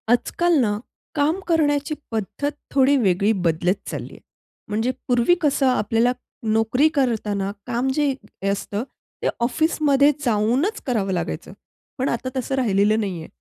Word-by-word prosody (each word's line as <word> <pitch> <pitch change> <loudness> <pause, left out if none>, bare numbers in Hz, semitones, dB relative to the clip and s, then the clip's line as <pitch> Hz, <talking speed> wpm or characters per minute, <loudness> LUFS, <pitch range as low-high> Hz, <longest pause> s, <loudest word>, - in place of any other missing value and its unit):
आजकाल 340 +8 +2
ना 210 -5 +1 0.4
काम 305 +5 +2
करण्याची 300 -2 +2 0.2
पद्धत 225 +7 -2 0.2
थोडी 275 +1 +4
वेगळी 200 -2 +2
बदलत 175 -2 +1 0.2
चालली - - -6
आहे. - - -13 0.5
म्हणजे 225 +4 0 0.2
पूर्वी 245 +7 +4
कसं 285 -3 +2
आपल्याला 230 -1 +2 0.4
नोकरी 225 +7 +3
करताना 210 -7 0 0.2
काम 245 +1 0
जे 290 -1 +1 0.4
असतं 200 +2 -3 0.4
ते - - 0
ऑफिसमध्ये 285 +2 +3
जाऊनच 245 - +1
करावं 210 -6 0
लागायचं. 180 - -3 0.5
पण 265 +1 0
आता 245 +2 -2
तसं 260 +1 -1
राहिलेलं 215 -4 +2
नाहीये. 180 -6 -3
240 Hz, 130 wpm, -22 LUFS, 210-285 Hz, 0.5 s, थोडी